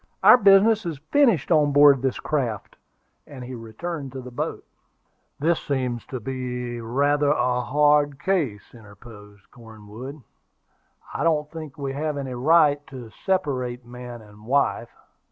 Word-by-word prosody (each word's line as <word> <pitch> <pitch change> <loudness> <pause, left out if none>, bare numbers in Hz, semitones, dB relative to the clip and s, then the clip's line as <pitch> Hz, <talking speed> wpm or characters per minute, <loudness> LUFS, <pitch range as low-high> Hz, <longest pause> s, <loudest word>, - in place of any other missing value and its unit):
"Our - - +9
business 210 +1 +5
is 165 -5 -4
finished 235 - +3
on 150 -3 +3
board 145 -1 +7
of - - -11
this 130 -2 -1
craft:" 125 -9 -3 0.5
and 130 -3 -10
he 125 +1 -8
returned 135 +6 -6
to 130 - -6
the 125 0 -10
boat. 120 - -4 0.7
"This 165 +3 +1
seems 125 -4 -3
to 130 - -5
be 125 -1 -5
rather 140 +5 +1
a 125 -4 +1
hard 145 +2 +2
case," 150 - -2
interposed 105 -2 -15
Cornwood. 115 +5 -11 0.9
"I - - -2
don't 150 -3 +1
think 155 -3 -9
we 140 -2 -4
have 150 +1 -3
any 135 -2 -5
right 145 +2 +3
to 125 -4 -10
separate 130 - -2
man 120 -1 -10
and 105 +1 -17
wife." 140 +2 +1
135 Hz, 145 wpm, -23 LUFS, 120-150 Hz, 0.9 s, Our